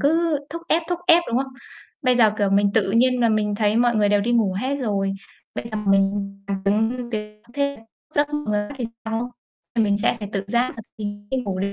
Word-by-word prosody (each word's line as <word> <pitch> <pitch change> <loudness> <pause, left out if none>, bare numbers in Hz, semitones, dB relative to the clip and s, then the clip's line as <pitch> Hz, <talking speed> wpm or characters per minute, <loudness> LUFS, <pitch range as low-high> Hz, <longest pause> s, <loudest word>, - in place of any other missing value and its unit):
cứ 320 +1 +2
thúc 335 +2 -6
ép, 330 +2 +3
thúc 355 -1 -1
ép, 340 0 +7
đúng 235 - +1
không? 265 -1 -10 0.5
Bây 255 -2 +3
giờ, 225 -3 +6
kiểu, 200 -2 +2
mình 200 +1 +4
tự 205 -3 +3
nhiên 250 +3 +3
là 235 - +4
mình 210 -1 +1
thấy 210 0 +2
mọi 240 0 +3
người 210 -1 +3
đều 205 0 +3
đi 235 +4 0
ngủ 220 -5 +3
hết 270 +4 -1
rồi, 200 -7 -1 0.4
bây - - -4
giờ - - -1
mình 195 0 +1
làm 195 -1 -2
giống 210 +3 +3
như 245 -1 -6
thế 210 0 -5
thế 280 -2 0 0.4
dẫm 290 0 +3
vào 295 0 -2
người 210 -2 -1
khác - - -8
thì 245 - -2 0.2
sao. 225 +2 -3 0.4
À, 235 - +2
mình 200 -2 +2
sẽ 230 +3 +1
phải 205 -2 -6
tự 195 0 -2
giác 240 +4 +1
là 225 - -7 0.2
mình 205 -1 -6
đi 265 - 0
ngủ 200 -7 -2
liền. 200 +1 -1
220 Hz, 245 wpm, -23 LUFS, 205-255 Hz, 0.5 s, ép